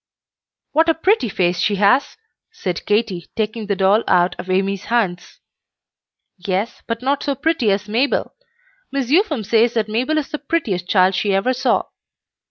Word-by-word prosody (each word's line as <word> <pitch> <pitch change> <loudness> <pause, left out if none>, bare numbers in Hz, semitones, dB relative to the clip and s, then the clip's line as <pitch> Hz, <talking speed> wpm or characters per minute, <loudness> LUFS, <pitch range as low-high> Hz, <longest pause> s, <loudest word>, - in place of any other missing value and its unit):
"What 320 +2 +3
a 325 - +3
pretty 375 - +1
face 180 -2 0
she 205 - +1
has!" 210 +8 +2 0.3
said 185 - -5
Katy, 205 -5 0
taking 220 -1 -3
the 200 - 0
doll 195 +3 +3
out 175 0 +3
of 185 - -7
Amy's 195 +1 0
hands. 190 -7 -2 1.0
"Yes, 190 +4 -3
but 230 +1 -4
not 275 +1 0
so 280 - -1
pretty 285 -5 0
as 200 +1 0
Mabel. 240 +7 0 0.6
Miss 275 -2 -2
Upham 310 - +2
says 230 +3 +2
that 220 -2 0
Mabel 250 +9 -1
is 300 - -2
the 300 - -3
prettiest 230 - -2
child 185 -1 +4
she 195 +1 0
ever 205 +7 +1
saw. 255 - +1
220 Hz, 165 wpm, -19 LUFS, 195-270 Hz, 1.0 s, child